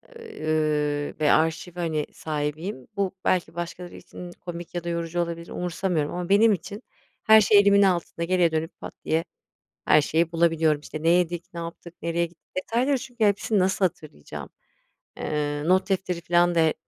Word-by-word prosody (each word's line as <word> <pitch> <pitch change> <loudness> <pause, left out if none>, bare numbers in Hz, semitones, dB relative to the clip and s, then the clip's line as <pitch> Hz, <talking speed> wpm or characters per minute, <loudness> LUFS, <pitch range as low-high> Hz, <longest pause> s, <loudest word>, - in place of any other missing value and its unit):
ııı, 155 - -1
ve 150 -1 +3
arşiv, 160 +2 +1
hani, 160 -4 -1
sahibiyim. 150 0 -4
Bu 195 -1 -1
belki 180 -2 +1
başkaları 175 +1 -6
için 180 -1 -10
komik 175 -1 -8
ya 175 - -2
da 170 - -3
yorucu 170 0 -2
olabilir, 170 0 -4
umursamıyorum 175 -3 -1
ama 180 0 -4
benim 210 +2 +6
için 200 +5 -6 0.4
her 220 0 +8
şey 205 0 +6
elimin 200 0 +5
altında. 175 -3 +1
Geriye 180 -1 +2
dönüp, 160 +1 -3
pat - - -8
diye 160 +1 +1 0.6
her 155 - +6
şeyi 165 +3 +1
bulabiliyorum. 165 -2 +2
İşte, 155 +1 -8
ne 165 - +2
yedik, 175 0 +2
ne 170 - -4
yaptık, 170 0 -8
nereye 170 +1 0
git 170 0 -21 0.2
detayları 250 +8 +1
çünkü 245 -3 -3
hepsini 205 +1 +2
nasıl 190 +1 +2
hatırlayacağım? 155 - -5 0.7
Eee, 145 -1 -2
not 185 +2 +3
defteri 185 -3 -1
filan 175 +1 +3
da 165 - +3
e 160 -1 +3
170 Hz, 165 wpm, -25 LUFS, 160-185 Hz, 0.7 s, her